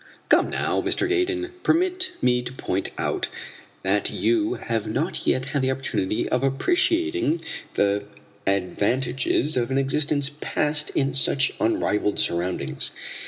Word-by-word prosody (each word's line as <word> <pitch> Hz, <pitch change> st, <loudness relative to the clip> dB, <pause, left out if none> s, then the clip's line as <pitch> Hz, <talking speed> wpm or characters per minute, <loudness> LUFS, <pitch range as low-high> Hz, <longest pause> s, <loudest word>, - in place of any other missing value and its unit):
"Come, -, -, +4 dB
now, -, -, 0 dB
Mr. 380 Hz, -, +1 dB
Gaydon, 360 Hz, -1 st, 0 dB
permit 370 Hz, +2 st, +1 dB
me 125 Hz, -1 st, +3 dB
to 120 Hz, 0 st, -6 dB
point 130 Hz, -, -2 dB
out -, -, -1 dB, 0.6 s
that -, -, +2 dB
you 340 Hz, 0 st, +1 dB
have 115 Hz, -2 st, -3 dB
not 140 Hz, +11 st, -2 dB
yet 130 Hz, +1 st, +1 dB
had 140 Hz, -1 st, 0 dB
the 130 Hz, -, +1 dB
opportunity 130 Hz, -7 st, -1 dB
of 125 Hz, +1 st, 0 dB
appreciating 340 Hz, -, +1 dB, 0.4 s
the 100 Hz, 0 st, +1 dB, 0.4 s
advantages 125 Hz, +9 st, +1 dB
of 120 Hz, -1 st, 0 dB
an 135 Hz, -, 0 dB
existence 145 Hz, +1 st, +1 dB
passed 150 Hz, 0 st, 0 dB
in 135 Hz, -1 st, +1 dB
such 135 Hz, 0 st, +4 dB
unrivalled 105 Hz, -2 st, +1 dB
surroundings. 85 Hz, +1 st, 0 dB
135 Hz, 130 wpm, -24 LUFS, -, 0.6 s, Come